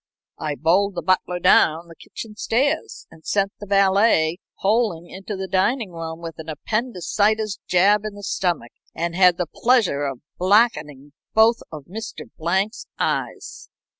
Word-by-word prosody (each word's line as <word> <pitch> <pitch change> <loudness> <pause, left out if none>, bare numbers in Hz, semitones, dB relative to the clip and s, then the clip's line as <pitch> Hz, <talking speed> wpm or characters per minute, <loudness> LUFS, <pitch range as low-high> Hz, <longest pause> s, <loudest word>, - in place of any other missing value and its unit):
I 150 -1 -3
bowled 185 +6 +2
the - - -4
butler 185 -1 +1
down 165 -1 +3
the 165 - -13
kitchen 215 +4 -10
stairs, 285 - -1
and 160 - -17
sent 200 +2 0
the 205 - -9
valet 195 -4 +3 0.2
howling 200 -5 +1
into 195 +3 -7
the 190 0 -5
dining 195 +3 0
room 165 0 -7
with 165 -1 -8
an 160 0 -8
appendicitis 215 - -1
jab 200 +3 +4
in 215 -1 -5
the 205 - -11
stomach 175 -10 -2 0.2
and 170 0 -2
had 180 -2 +5
the 180 - -1
pleasure 205 - +1
of 135 -3 -5 0.2
blacking 180 - +2 0.2
both 225 +1 +5
of 155 -3 -8
Mr. 220 +7 -7
Blank's 190 +7 -1
eyes." - - -3
190 Hz, 150 wpm, -22 LUFS, 165-215 Hz, 0.2 s, had